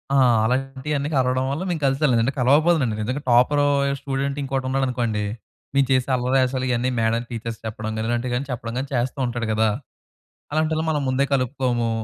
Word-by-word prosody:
ఆ! - - +5 0.3
అలాంటియన్నీ 135 +4 -1
కలవడం 130 0 +1
వల్ల 150 +6 -2
మేము 170 -3 -2
కలిసాం 135 +3 +2
లేదంటే 120 +3 +2
కలవకపోదునండి. 140 -1 +3
నిజంగా 125 +7 -2
టాపరు 130 +4 +4 0.3
స్టూడెంట్ 140 +1 -2
ఇంకొకడు 135 -1 -2
ఉన్నాడనుకోండి, 125 -5 0 0.5
మేము 140 -1 +4
చేసే 130 0 +2
అల్లరి 125 +1 +1
యేషాలు 130 0 0
ఇయన్నీ 125 +1 +1
మేడం 115 +1 +1
టీచర్స్‌కి 115 -1 -5
చెప్పడం 110 0 -5
కాని 110 +1 -2
ఇలాంటివి 120 +1 -1
గాని 130 +3 -2
చెప్పడం 115 -1 -4
కాని 135 +1 -4
చేస్తూ 125 +2 -1
ఉంటాడు 120 -2 -3
కదా! 110 0 +2 0.8
అలాంటోళ్ళని 155 +1 0
మనం 150 -2 -1
ముందే 130 +2 +2
కలుపుకోము. 125 -3 0
130 Hz, 165 wpm, -23 LUFS, 120-140 Hz, 0.8 s, ఆ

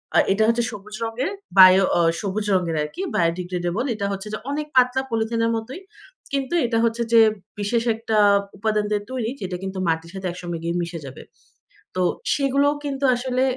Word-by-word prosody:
আর - - +6
এটা 220 +2 +2
হচ্ছে 230 +1 +2
সবুজ 210 +1 -9
রঙের, 235 +8 -2 0.3
বায়ো 185 +1 +9
অ 175 - +4 0.2
সবুজ 205 +1 -2
রঙের 175 -3 +1
আরকি, 150 - -5
বায়ো 165 -1 +3
ডিগ্রেডেবল। 180 +4 -2
এটা 200 - -3
হচ্ছে 195 +1 -5
যে, 215 - -1
অনেক 300 +1 -3
পাতলা 255 +1 +4
পলিথিনের 230 0 0
মতোই। 235 +9 -5 0.5
কিন্তু 275 +3 -1
এটা 230 -1 0
হচ্ছে 230 0 0
যে, 230 - +8 0.4
বিশেষ 225 +3 0
একটা 225 -1 -2 0.4
উপাদান 215 0 0
দিয়ে 210 -1 0
তৈরি, 245 -3 -2
যেটা 180 -1 -4
কিন্তু 190 0 -5
মাটির 165 +1 -1
সাথে 190 -1 -4
একসঙ্গে 175 -1 -5
গিয়ে 170 +1 -2
মিশে 170 0 -5
যাবে। 135 -1 -9 0.7
তো 185 - 0 0.3
সেগুলোও 280 +1 +2
কিন্তু 280 -1 -4
আসলে 255 +1 -1
215 Hz, 175 wpm, -22 LUFS, 185-245 Hz, 0.7 s, বায়ো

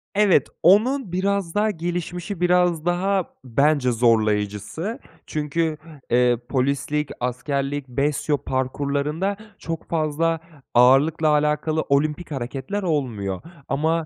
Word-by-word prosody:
Evet, 205 -3 +4 0.2
onun 215 - +4
biraz 190 -1 -1
daha 215 +1 +2
gelişmişi, 175 +2 -4
biraz 180 -2 +2
daha 185 +1 0
bence 140 +1 +2
zorlayıcısı 110 - 0 0.3
çünkü, 155 +1 -1 0.3
eee, 125 0 +3
polislik, 140 +3 0
askerlik, 135 +3 -2
BESYO 145 +3 0
parkurlarında 140 +8 -1 0.2
çok 165 -1 -6
fazla 165 +1 0 0.3
ağırlıkla 135 +6 +5
alakalı 150 +1 +1
olimpik 150 +4 0
hareketler 135 +9 -4
olmuyor. 115 - -2 0.3
Ama 160 +3 0
150 Hz, 100 wpm, -23 LUFS, 130-175 Hz, 0.3 s, ağırlıkla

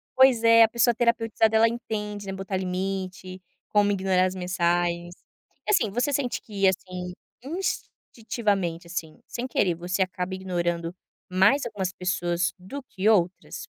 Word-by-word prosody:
Pois 260 -3 +5
é, 230 0 +8
a - - +6
pessoa 235 +1 +2
terapeutizada 225 -2 +2
ela 225 +1 +6
entende, 210 -3 -5
né, 195 - -4
botar 190 0 -3
limite, 185 0 -4 0.3
como 205 -1 +3
ignorar 190 -1 +2
as 185 - -1
mensagens. 175 -1 0 0.5
E - - +2
assim, 225 - +3
você 245 +6 0
sente 260 -3 -1
que, 200 -3 0
assim, 180 -1 -2 1.0
instintivamente, 200 -7 -1
assim, 165 -3 -6
sem 245 +2 -4
querer, 180 -8 +1
você 175 +2 -2
acaba 185 0 -2
ignorando 175 -2 -2 0.3
mais 190 +10 +4
algumas 195 -5 -3
pessoas 175 -1 -1
do 230 +11 -8
que 200 -4 -3
outras? 185 -4 +2
190 Hz, 145 wpm, -26 LUFS, 180-225 Hz, 1.0 s, é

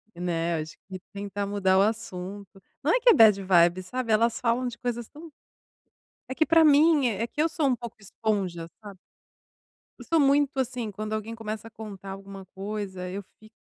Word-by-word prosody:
Né, 170 -1 -1
acho 155 0 -9
que 190 -1 -7
tentar 200 0 -4
mudar 190 -2 +2
o - - +6
assunto. 200 -3 -4 0.2
Não - - +2
é - - +3
que 485 +1 +5
é - - +9
bad 210 -3 +6
vibes, 180 0 +3
sabe, 250 -1 -3
elas 230 +1 +2
falam 245 +1 0
de 240 - -6
coisas 240 -2 -4
tão 315 +1 -12 1.0
é - - -4
que 315 +4 +1
pra 330 -1 +6
mim 300 -1 +5
é 225 +2 -2
que 295 - -11
eu 315 - +4
sou 310 -3 0
um 255 - +2
pouco 235 -1 -9
esponja, 190 -5 -3 0.2
sabe? 200 -3 -10 1.0
Eu - - -10
sou 330 - +2
muito, 280 0 +3
assim, 250 -3 -2
quando 215 +2 -6
alguém 215 +1 -3
começa 220 0 -6
a - - -20
contar 200 -3 -9
alguma 195 0 -9
coisa, 195 -2 -5
eu 200 +2 -5 0.2
fico 215 +1 -19
215 Hz, 195 wpm, -26 LUFS, 195-245 Hz, 1.0 s, é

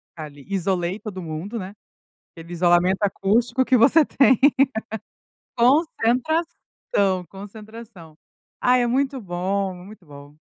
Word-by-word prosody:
Ali 145 -3 -10
isolei 190 0 -2
todo 190 -4 -8
mundo, 165 +8 -6
né. 190 0 -7 0.6
Aquele 165 +1 -12
isolamento 175 +3 +2
acústico 230 +6 +1
que 255 -1 +3
você 285 +7 +5
tem. 265 -3 +3 1.2
Concentração, 255 - 0
concentração. 205 -4 -12 0.5
Ah 250 0 +4
é 245 - +1
muito 265 +2 -1
bom, 190 0 -3
muito 185 +1 -14
bom. 145 +1 -15
200 Hz, 110 wpm, -22 LUFS, 175-240 Hz, 1.2 s, você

